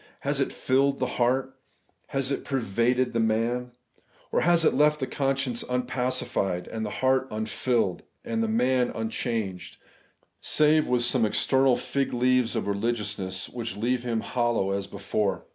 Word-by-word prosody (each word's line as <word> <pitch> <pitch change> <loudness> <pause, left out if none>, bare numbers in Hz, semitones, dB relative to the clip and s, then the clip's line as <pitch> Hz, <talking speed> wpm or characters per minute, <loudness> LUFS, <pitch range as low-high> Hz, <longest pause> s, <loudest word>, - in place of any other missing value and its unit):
Has - - 0
it - - 0
filled 135 +2 +1
the 130 - 0 0.2
heart? 130 +2 +1 0.5
Has 135 0 -2
it 140 - -2
pervaded 125 0 0
the 115 - +1
man? 115 +2 0 0.6
Or - - +2
has 170 -1 +4
it - - +4
left 150 +2 +3
the 130 - -1
conscience 135 -3 -1
unpacified, 125 -7 -1
the 110 -1 -3
heart 130 +3 +1
un 110 0 -3
filled, 110 -3 0 0.2
the 235 -1 -4
man 130 - +2
unchanged, 110 -4 -3 0.6
save 155 0 +3
with 125 -1 +2
some 120 0 +2
external 130 +3 +3
fig 135 +2 -2
leaves 125 -1 +2
of 115 - 0
reUgiousness, 100 -3 -2
which 115 -4 -4
leave 120 +3 0
him 115 -2 -1
hollow 120 -6 0
as 100 0 -2
before 100 0 -2
125 Hz, 145 wpm, -26 LUFS, 110-130 Hz, 0.6 s, has